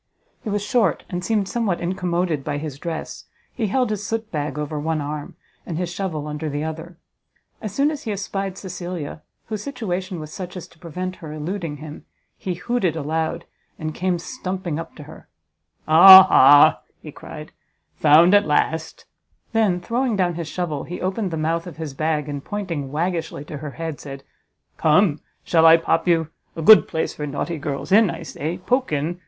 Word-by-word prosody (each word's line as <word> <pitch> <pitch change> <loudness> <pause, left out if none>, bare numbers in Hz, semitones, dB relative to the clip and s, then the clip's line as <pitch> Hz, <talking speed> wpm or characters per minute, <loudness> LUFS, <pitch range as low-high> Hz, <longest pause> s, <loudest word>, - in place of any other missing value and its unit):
He 220 - -4
was 205 0 -1
short, 220 -8 +1
and 180 0 -3
seemed 210 0 0
somewhat 215 -6 -1
incommoded 175 -3 -1
by 145 0 -3
his 145 -2 -6
dress; 165 -1 -6 0.3
he 225 -3 -1
held 250 +2 +1
his 210 -1 -3
soot 225 +1 -3
bag 150 -1 -3
over 150 0 -3
one 160 +1 -1
arm, 145 0 -5 0.3
and 165 - -5
his 175 0 -3
shovel 170 -6 -3
under 150 +1 -4
the 145 +1 -3
other. 160 +2 -6 0.6
As 215 - -4
soon 285 +2 +2
as 300 - -6
he 220 - -4
espied 195 -1 -4
Cecilia, 175 -5 -6 0.2
whose 215 -2 -5
situation 190 -8 -4
was 155 0 -8
such 185 0 -7
as 180 - -8
to 160 - -23
prevent 180 +2 -5
her 155 -2 -9
eluding 155 0 -4
him, 150 0 -10 0.3
he 185 -2 -4
hooted 190 -4 -1
aloud, 160 +2 -2 0.3
and 155 0 -4
came 185 +1 0
stumping 185 - -4
up 165 - -8
to 150 - -10
her; 155 +2 -14 0.6
"Ah 190 +4 +11
ha," 145 -1 +6 0.2
he - - -8
cried, - - -10 0.5
"found 160 +5 +6
at 205 0 +5
last;" 160 +2 -1 0.5
then, 210 -6 +2
throwing 240 +4 -1
down 180 -3 +1
his 170 -1 -5
shovel, 160 -4 -3
he 175 - -7
opened 190 +2 -2
the 165 - -4
mouth 165 +2 -1
of 170 - -9
his 160 -4 -5
bag, 155 0 -1
and 145 -1 -5
pointing 170 -10 -4
waggishly 165 -1 -2
to 150 - -7
her 145 -1 -7
head, 160 -3 -4
said, 135 -1 -9 0.5
"Come, 155 0 +3 0.2
shall 165 -1 +4
I 165 0 +9
pop 165 0 0
you? 165 -3 +2 0.3
a 165 - -4
good 215 +6 +8
place 160 - -2
for 150 - -5
naughty 155 +3 -3
girls; 140 +3 -4
in, 210 0 +6
I 170 - -6
say, 160 +2 -4
poke 250 +6 0
in! 155 +4 -2
170 Hz, 185 wpm, -22 LUFS, 155-190 Hz, 0.6 s, Ah